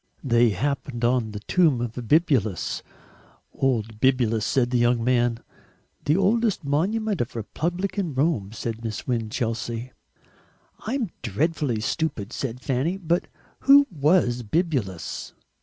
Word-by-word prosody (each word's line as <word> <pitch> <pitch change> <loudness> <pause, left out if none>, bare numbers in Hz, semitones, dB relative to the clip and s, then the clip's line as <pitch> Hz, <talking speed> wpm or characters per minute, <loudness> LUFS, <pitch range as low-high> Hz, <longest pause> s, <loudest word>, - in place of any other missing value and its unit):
They 120 -3 +4
happened 120 +3 -2
on 120 -2 +2
the 105 0 -6
tomb 160 - +3
of 120 -1 -2
Bibulus. 125 - +1 0.7
"Old 115 -5 -1
Bibulus," 120 -5 +2
said 125 -3 +1
the 125 - +2
young 120 -1 +2
man. 120 -1 +2 0.6
"The 150 +4 +3
oldest 215 +1 +2
monument 195 - 0
of 120 +1 -4
Republican 175 - -2
Rome!" 130 - +1
said 115 0 -5
Miss 110 -2 -4
Winchelsea. 115 0 -2 1.0
"I'm 235 -5 -1
dreadfully 130 - -1
stupid," 115 -4 -2
said 125 -2 -4
Fanny, 140 +9 0
"but 170 -2 0 0.3
who 280 +1 +7
WAS 145 -6 +2
Bibulus?" 120 - -2
130 Hz, 120 wpm, -25 LUFS, 115-165 Hz, 1.0 s, who